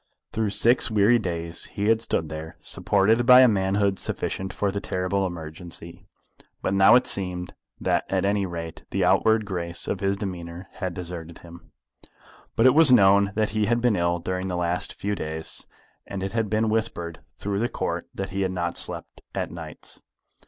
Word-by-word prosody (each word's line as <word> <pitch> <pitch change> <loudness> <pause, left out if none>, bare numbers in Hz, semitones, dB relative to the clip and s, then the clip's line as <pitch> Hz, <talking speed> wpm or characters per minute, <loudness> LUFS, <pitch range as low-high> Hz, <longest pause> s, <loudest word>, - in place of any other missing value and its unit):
Through 110 -1 -1
six 120 +5 +4
weary 110 +2 +4
days 85 -4 -2
he 100 - -4
had 115 +1 +3
stood 85 -8 -1
there, 80 +1 -7
supported 105 +4 +2
by 125 0 +9
a 130 - +7
manhood 100 -1 +1
sufficient 95 0 -3
for 100 +3 -1
the 100 +1 -4
terrible 95 +1 -1
emergency. 85 +2 -9 0.6
But - - 0
now 95 +4 +6
it 125 - +4
seemed 90 -2 0 0.3
that - - 0
at - - 0
any 100 -1 +1
rate 85 -2 -7
the - - 0
outward 110 -1 +3
grace 85 -3 -2
of 95 - -2
his 100 +1 0
demeanour 90 -2 -6
had 95 -4 -5
deserted 85 -2 -7
him. 85 0 -14 0.8
But 115 - +3
it 130 - +7
was 155 -3 +7
known 100 -3 +5
that 110 -1 +1
he 105 0 0
had 120 +1 +2
been 120 -3 +2
ill 85 -1 +1
during 95 +2 -3
the 90 -1 -3
last 90 +1 -2
few 100 +1 -3
days, 80 -4 -3 0.4
and 95 -1 -5
it 95 - -3
had 110 -2 -1
been 110 +1 +1
whispered 110 -7 -2 0.2
through 100 -1 -2
the 120 +2 0
Court - - -3
that 95 0 -4
he 95 +1 -3
had 95 -1 0
not 85 -2 -2
slept - - -1
at - - -3
nights. - - -9
95 Hz, 185 wpm, -24 LUFS, 85-105 Hz, 0.8 s, by